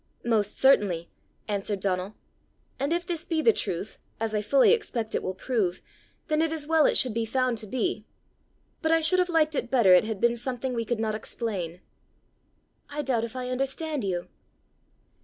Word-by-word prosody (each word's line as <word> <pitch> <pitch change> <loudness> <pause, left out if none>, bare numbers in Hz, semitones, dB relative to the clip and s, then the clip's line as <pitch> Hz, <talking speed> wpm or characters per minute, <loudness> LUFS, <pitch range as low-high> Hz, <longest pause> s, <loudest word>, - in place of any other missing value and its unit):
"Most 215 -3 +1
certainly," 200 -11 +3 0.4
answered 205 -1 -2
Donal. 190 +1 -2 0.6
"And 280 +3 -1
if 345 +1 0
this 340 -3 -2
be 325 -2 -1
the 455 - +6
truth, 180 - -4 0.2
as 225 -1 -2
I 210 - +1
fully 265 +6 +4
expect 240 - -2
it - - 0
will 185 - -4
prove, 190 -4 -1 0.5
then 305 0 +1
it 325 -1 +1
is 315 -2 -2
well 320 -1 +4
it - - +3
should 250 -4 +2
be 230 +1 0
found 250 0 0
to 215 - -7
be. 220 -2 -2 0.7
But 320 -2 +1
I 325 - +5
should 365 +4 +3
have 360 0 +2
liked 315 -2 +2
better 235 -8 +5
it 180 - +6
had 220 -2 -4
been 235 +2 +3
something 250 +1 -3
we 230 -1 -2
could 235 0 -2
not 220 -1 0
explain." 195 -6 -4 1.1
"I 295 +1 -3
doubt 245 -4 0
if 230 - -10
I 250 -1 -4
understand 270 +2 -2
you." 180 -3 -2
235 Hz, 185 wpm, -27 LUFS, 210-290 Hz, 1.1 s, the